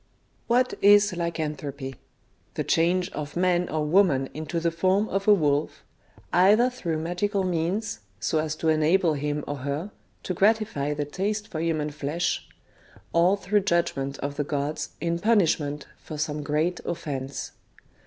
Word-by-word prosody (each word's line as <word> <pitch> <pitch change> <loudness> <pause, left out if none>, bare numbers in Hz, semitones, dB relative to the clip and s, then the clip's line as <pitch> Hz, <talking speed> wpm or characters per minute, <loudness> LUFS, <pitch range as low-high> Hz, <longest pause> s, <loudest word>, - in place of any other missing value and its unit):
What 250 +2 +2
is 205 0 +6
Lycanthropy? 150 -5 -4 0.6
The - - -1
change 175 +2 +1
of 150 -1 -6
man 180 0 +2
or 155 -1 -1
woman 150 -6 +3
into 155 +2 -3
the 165 0 0
form 185 +5 +2
of 195 +1 -2
a 210 - +8
wolf, 150 -4 0 0.5
either 210 +8 +5
through 170 -10 -3
magical 180 +5 -1
means, 180 +4 -1 0.2
so 160 - 0
as 155 0 -2
to 160 +1 0
enable 160 +2 +3
him 145 0 -2
or 145 - -4
her 140 +8 -4 0.3
to 185 - -2
gratify 200 -8 +1
the 145 0 -2
taste 205 +7 -2
for 160 - -4
human 155 -2 -1
flesh, 150 +4 -2 0.6
or 175 +4 +4
through 205 +1 +1
judgment 170 -7 0
of 140 +1 -4
the 145 - +1
gods 145 +1 -2
in 170 0 -1
punishment 160 -9 +2
for 155 - -8
some 150 0 -2
great 155 +5 0
offence. 140 -5 -4
165 Hz, 150 wpm, -26 LUFS, 150-190 Hz, 0.6 s, a